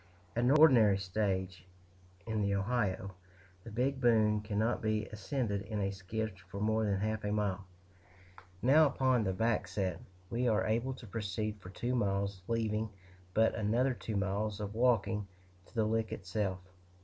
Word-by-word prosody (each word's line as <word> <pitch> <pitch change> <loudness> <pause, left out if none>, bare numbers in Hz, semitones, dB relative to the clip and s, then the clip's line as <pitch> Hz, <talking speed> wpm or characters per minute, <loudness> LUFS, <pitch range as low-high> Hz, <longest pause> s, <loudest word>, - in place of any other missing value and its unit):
At 120 +1 +2
an - - +4
ordinary 130 -9 +6
stage 95 -2 -2 0.6
in 110 -1 -1
the 100 -1 +1
Ohio, 100 -2 -1 0.5
the 115 - -8
Big 130 +5 -1
Bone 110 -3 +4
cannot 110 +2 0
be 110 -1 0
ascended 105 0 -2
in 105 +1 -4
a 100 -1 0
skiff 100 +2 -4
for 100 - -6
more 110 +1 +1
than 100 -2 +1
half 110 0 -1
a 105 - -1
mile; 100 -2 -1 1.0
now, 150 +5 +6
upon 130 -3 +2
the 95 - 0
backset, 95 -3 -1 0.3
we 120 +2 0
are 110 -2 +2
able 120 +4 0
to 120 - -11
proceed 105 0 -3
for 90 - -10
two 120 +6 -3
miles, 100 -4 0
leaving 110 -1 0 0.5
but 110 +1 +4
another 120 +5 +1
two 110 -2 -5
miles 100 +1 -1
of 105 0 -4
walking 110 -3 +2 0.4
to - - -22
the 110 -2 +2
Lick 110 0 0
itself. 95 0 -2
110 Hz, 160 wpm, -33 LUFS, 100-115 Hz, 1.0 s, ordinary